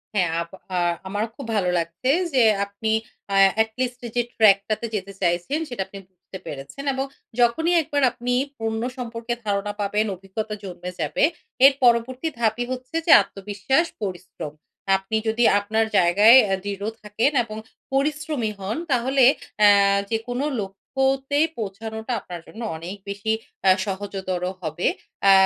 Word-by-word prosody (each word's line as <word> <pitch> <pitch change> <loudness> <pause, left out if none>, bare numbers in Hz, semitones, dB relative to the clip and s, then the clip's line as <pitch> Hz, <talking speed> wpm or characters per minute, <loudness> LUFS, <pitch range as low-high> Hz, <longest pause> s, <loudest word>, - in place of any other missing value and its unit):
হ্যাঁ 180 -4 +2
আপ 170 - -6 0.3
আ - - +1 0.3
আমারও 205 +3 -2
খুব 275 - -8
ভালো 185 -3 +1
লাগছে 170 +9 -2 0.2
যে, 260 - +4 0.2
আপনি 200 +2 -3 0.4
আ - - +2 0.3
এট 220 - +1
লিস্ট 250 -1 -1
এই - - -9
যে 240 - +3
track 205 -3 +6
টাতে 215 +2 -1
যেতে 195 0 -4
চাইছেন, 175 - 0
সেটা 245 -6 -4
আপনি 195 - -10
বুঝতে 185 +1 -12
পেরেছেন 140 - -7
এবং 265 +1 -1 0.3
যখনই 320 +9 +3
একবার 290 -2 -1
আপনি 245 0 -3 0.3
পণ্য 225 0 -2 0.2
সম্পর্কে 235 -1 -4
ধারণা 205 0 -1
পাবেন, 210 +2 +1
অভিজ্ঞতা 200 +3 -5
জন্মে 180 -1 -6
যাবে, 150 - 0 0.4
এর 275 - +8
পরবর্তী 245 +4 +3
ধাপই 230 +1 +1
হচ্ছে 255 +4 -6
যে - - +4
আত্মবিশ্বাস, 205 - -1 0.2
পরিশ্রম। 175 -6 -6 0.4
আপনি 195 +3 -5
যদি 225 +2 +1 0.2
আপনার 220 +2 0
জায়গায় 205 +8 +7
অ্যা 195 -1 0
দৃঢ় 200 +1 -4
থাকেন 215 +7 +1
এবং 215 -1 -8 0.4
পরিশ্রমী 295 -4 0
হন, 195 +6 -3
তাহলে 260 +2 +3 0.4
অ্যা 210 -1 +8 0.4
যেকোনো 245 +5 -2 0.2
লক্ষ্যতেই 270 +9 0
পৌঁছানোটা 220 +3 -5
আপনার 175 -2 -8
জন্য 225 - -10 0.2
অনেক 175 +5 -7
বেশি 200 +2 -1 0.3
আ - - +8 0.2
সহজতর 190 -2 -4 0.2
হবে। 155 +1 -2 0.4
আ - - +9
220 Hz, 150 wpm, -23 LUFS, 195-245 Hz, 0.4 s, আ